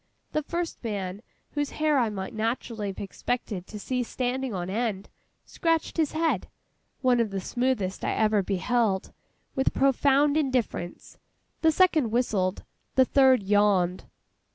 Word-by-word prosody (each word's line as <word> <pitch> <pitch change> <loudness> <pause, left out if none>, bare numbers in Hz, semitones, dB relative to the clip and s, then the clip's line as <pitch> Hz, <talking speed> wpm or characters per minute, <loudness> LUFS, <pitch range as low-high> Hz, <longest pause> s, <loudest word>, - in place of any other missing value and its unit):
The 305 - 0
first 340 +1 -4
man, 200 -3 -3 0.3
whose 290 -1 -1
hair 305 -2 +3
I 235 -3 +2
might 195 -2 -5
naturally 225 -1 -2
have 195 - -5
expected 200 -2 -3
to 215 - -8
see 250 +5 -2
standing 255 +1 -2
on 180 -3 -3
end, 205 -1 -2 0.4
scratched 330 -1 -1
his 315 -3 +1
head—one 255 - -1
of 230 -2 +1
the 195 -1 -3
smoothest 230 -2 -1
I - - 0
ever 215 -1 +3
beheld—with 210 +5 -2
profound 280 +2 +3
indifference. 255 - -2 0.4
The 320 - +5
second 315 -7 +3
whistled. 210 -5 0 0.3
The 260 - +6
third 260 -4 +4
yawned. 195 -3 +2
240 Hz, 130 wpm, -27 LUFS, 200-270 Hz, 0.4 s, The